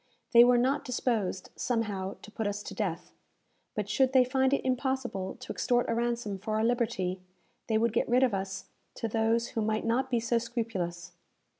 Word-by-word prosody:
They 235 0 +9
were 245 0 +5
not 265 +4 +2
disposed, 225 -7 -1
somehow, 205 -5 -2
to 215 - -11
put 220 -1 -2
us 205 0 -3
to - - -7
death; 180 -5 -3 0.6
but 210 -2 -2
should 260 +5 +2
they 260 -1 +7
find 265 +1 +1
it 280 - +1
impossible 255 -7 -1
to 255 - -6
extort 245 -1 +1
a - - 0
ransom 235 -4 -1
for 215 +2 -3
our 220 - +1
liberty, 225 -6 0 0.5
they 220 - +2
would 230 0 +1
get 235 - +1
rid 250 +2 +4
of 250 -5 +3
us 195 0 -3 0.3
to 230 - -3
those 225 +1 +1
who 225 - -2
might 215 +1 0
not 250 +3 +1
be 240 -2 +2
so 235 +1 +1
scrupulous. 195 -8 -4
230 Hz, 190 wpm, -29 LUFS, 205-245 Hz, 0.6 s, They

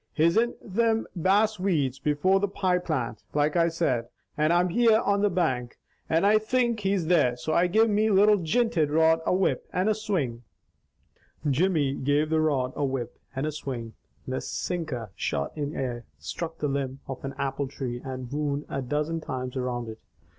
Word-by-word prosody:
He's 165 +3 +3
in 235 +2 +2
thim 225 +2 +1
bass 200 +4 +2
weeds 145 -9 0
before 150 +7 +2
the 205 - +1
pie 185 -2 0
plant, 125 -11 -3
like 150 +1 +2
I 170 -1 +4
said, 140 -8 0 0.3
and 155 +1 +2
I'm 175 +1 +3
here 225 +3 +4
on 200 -2 +1
the 205 - +3
bank, 130 -10 -1 0.3
and 165 +4 +3
I 215 +1 +5
THINK 235 +1 +1
he's 195 -3 0
there, 140 -8 +3
so 155 +5 -2
I 175 +2 +4
give 220 +5 +4
me 215 +1 +2
little 205 +1 +5
jinted 175 -2 +1
rod 160 +1 +4
a - - +3
whip 190 0 0
and 185 +3 0
a 215 - +4
swing 180 - -2 0.5
" - - -13
Jimmy 155 -2 +2
gave 145 +3 0
the 160 0 +3
rod 135 -5 +1
a - - -1
whip 130 -3 -3 0.2
and 135 +2 -1
a 155 - -1
swing. 125 -6 -6 0.3
The 130 0 -2
sinker 150 - -4
shot 70 -4 -2
in 150 -1 -3
air, 120 -3 -3
struck 160 - -5
the 150 - -1
limb 135 -1 -3
of 135 -1 -6
an 135 0 -5
apple 140 0 -2
tree 125 -3 -5
and 130 -2 -6
wound 145 0 -2
a 135 - -2
dozen 150 +5 -2
times 130 -3 -5
around 125 -2 -2
it. 110 0 -8
155 Hz, 190 wpm, -27 LUFS, 130-190 Hz, 0.5 s, I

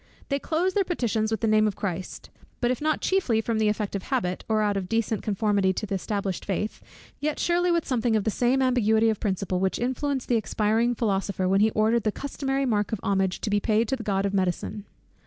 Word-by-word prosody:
They 280 0 0
close 345 +6 0
their 405 - +2
petitions 230 - -1
with 220 +1 -2
the 225 - +1
name 215 0 +4
of 205 - -2
Christ; 185 -2 -5 0.3
but 240 0 +1
if 255 - -3
not 310 0 0
chiefly 360 -13 +1
from 225 0 -1
the 215 - +3
effect 210 -1 -1
of 200 - -2
habit, 185 -7 -2
or 215 -1 +2
out 205 -1 +1
of 190 -2 -3
decent 225 -2 0
conformity 205 -2 +1
to 215 - -3
the 200 - -5
established 195 -1 -2
faith, 205 +2 -3 0.4
yet 300 0 -1
surely 350 +1 +1
with 340 -2 +1
something 235 -3 +1
of 215 - +1
the 220 - 0
same 255 +4 +2
ambiguity 225 -3 +3
of 215 - -4
principle 190 -3 -1
which 190 0 0
influenced 260 +2 -2
the 240 - +3
expiring 225 +2 +1
philosopher, 195 -4 -1
when 195 +2 +3
he 220 - +5
ordered 220 +2 +3
the 215 - 0
customary 275 +2 -2
mark 210 -4 0
of 220 - -2
homage 195 -2 0
to 210 - -2
be 205 - +3
paid 220 +2 +1
to 265 - +1
the 250 - -7
god 200 -2 0
of 200 - -1
medicine. 190 +2 -1
220 Hz, 230 wpm, -26 LUFS, 200-245 Hz, 0.4 s, he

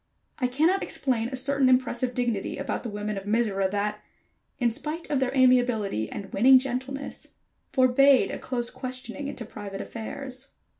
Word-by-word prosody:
I 250 - +2
cannot 320 +10 +2
explain 235 -4 -1
a 260 - -4
certain 265 0 +2
impressive 255 -1 +1
dignity 235 -5 -1
about - - -3
the 235 - -5
women 210 0 -3
of 195 - -13
Mizora 205 -3 +1
that, 210 +1 -2 0.6
in 240 -2 +2
spite 300 +6 -4
of 285 - +2
their 260 -1 0
amiability 245 - +3
and 200 - -7
winning 260 +5 +7
gentleness, 265 +2 -4 0.4
forbade 260 +1 +5
a - - -5
close 240 -2 -3
questioning 255 +2 -6
into 255 -4 -6
private 205 -3 -7
affairs. 260 +5 -7
250 Hz, 155 wpm, -26 LUFS, 220-265 Hz, 0.6 s, winning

